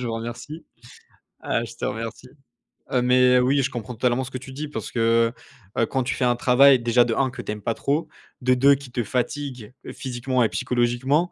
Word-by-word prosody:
Je 125 - -3
vous 115 - -3
remercie, 120 +8 -6 0.8
heu, - - 0
je - - -9
te - - -5
remercie. 115 +3 -5 0.6
Heu, 125 - +2
mais 125 0 +5
oui, 135 +3 +3
je 130 - -1
comprends 120 +1 -6
totalement 125 +2 +1
ce 125 - -7
que 130 - -4
tu 130 +1 -11
dis, 150 +2 -5
parce 150 - -6
que, 115 0 +2 0.4
ben, 115 - +2
quand 130 -1 -1
tu 125 - -2
fais 125 - -1
un 120 0 +3
travail 130 +2 +5
déjà 120 +1 +3
de 115 - -1
1 135 -1 +1
que - - -7
tu - - -5
aimes 105 -1 -6
pas 115 - 0
trop, 150 +7 -1 0.3
de 130 0 +3
2 140 +3 +5
qui 135 -2 -11
te 120 -1 -1
fatigue 125 0 -3 0.2
physiquement 130 -1 -1
et 110 - +2
psychologiquement 125 +7 0
125 Hz, 220 wpm, -23 LUFS, 120-135 Hz, 0.8 s, mais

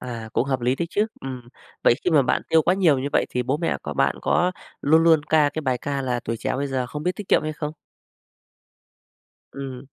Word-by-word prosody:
À, 115 -3 -6
cũng - - +2
hợp 130 -2 -1
lý 125 +2 +1
đấy 170 +4 -2
chứ, 210 +3 +1 0.2
ừm. 130 -2 -6 0.4
vậy 120 - +5
khi 180 - +2
mà 150 -4 +5
bạn 125 - +1
tiêu 160 - +5
quá 175 +4 +2
nhiều 165 -8 +3
như 135 - -2
vậy - - +2
thì 125 - -1
bố 130 +4 0
mẹ 165 +1 -1
có 75 - -5
bạn - - +1
có 180 +1 +2 0.3
luôn 160 +3 +4
luôn 160 -3 +5
ca 150 -1 +3
cái 155 - -4
bài 130 -3 0
ca 140 +2 -3
là 125 -2 -1
tuổi 115 -1 -4
trẻ - - -2
bây 140 +1 -2
giờ 130 -2 -1
không 150 +4 -6
biết 180 - +1
tiết 210 - -8
kiệm - - +4
hay 155 0 -3
không? 150 0 -5 1.8
Ừm. 135 -1 -7
140 Hz, 240 wpm, -23 LUFS, 125-160 Hz, 1.8 s, vậy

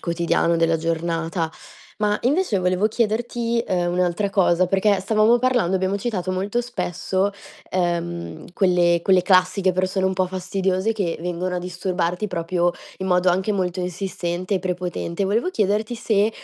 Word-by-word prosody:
quotidiano 170 0 +1
della 165 0 +2
giornata. 165 0 -2 0.5
Ma 210 0 +1
invece 285 - +2
volevo 185 +3 +1
chiederti, 235 +1 0
ehm, 175 -2 0
un'altra 180 +2 0
cosa 185 -2 +3
perché 195 +2 +2
stavamo 215 +4 +3
parlando, 245 -7 +2
abbiamo 190 +2 0
citato 195 -4 -2
molto 200 +6 -1
spesso, 195 -4 -2 0.4
ehm, 175 -1 -3
quelle 175 -3 +3
quelle 185 -2 +4
classiche 185 0 +3
persone 185 +1 0
un 190 - +2
po' 185 0 0
fastidiose 185 +2 -1
che 195 -6 -2
vengono 180 +1 -3
a - - -1
disturbarti 180 +1 -2
proprio 175 -1 0 0.3
in 190 - -3
modo 180 0 +3
anche 190 +4 0
molto 185 -2 -1
insistente 180 +1 -3
e - - +2
prepotente. 180 0 -3
Volevo 220 - +1
chiederti 215 - 0
se 220 -2 +1
185 Hz, 145 wpm, -22 LUFS, 175-205 Hz, 0.5 s, quelle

